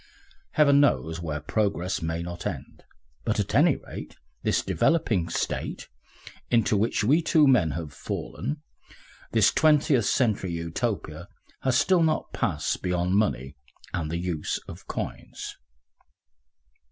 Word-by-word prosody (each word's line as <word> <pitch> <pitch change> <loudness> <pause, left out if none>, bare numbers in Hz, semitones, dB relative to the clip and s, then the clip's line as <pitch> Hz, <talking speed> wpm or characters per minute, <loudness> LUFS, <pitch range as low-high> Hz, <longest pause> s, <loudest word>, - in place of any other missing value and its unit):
Heaven 140 -2 +5
knows 80 - +2
where 80 -3 -3
progress 100 0 -1
may 80 +1 -2
not 85 +2 -5
end, 80 -10 -7 0.4
but - - 0
at - - -1
any - - +5
rate - - -9 0.3
this - - +1
developing 110 - +1
State, - - -3 0.6
into 115 -2 +3
which 105 +1 +1
we 145 +10 +4
two 155 -2 +4
men 125 -12 +4
have 80 -4 -6
fallen, 145 - -5 0.7
this 110 0 +5
Twentieth 150 -6 +4
Century 105 -9 +1
Utopia, 85 0 -3 0.3
has 130 -2 +2
still 175 +5 +4
not 160 -1 0
passed 75 0 -1
beyond 90 0 0
money 70 - 0 0.4
and 80 -3 -2
the 85 - -2
use 85 -3 -2
of - - -10
coins. - - -6
100 Hz, 130 wpm, -26 LUFS, 85-135 Hz, 0.7 s, Heaven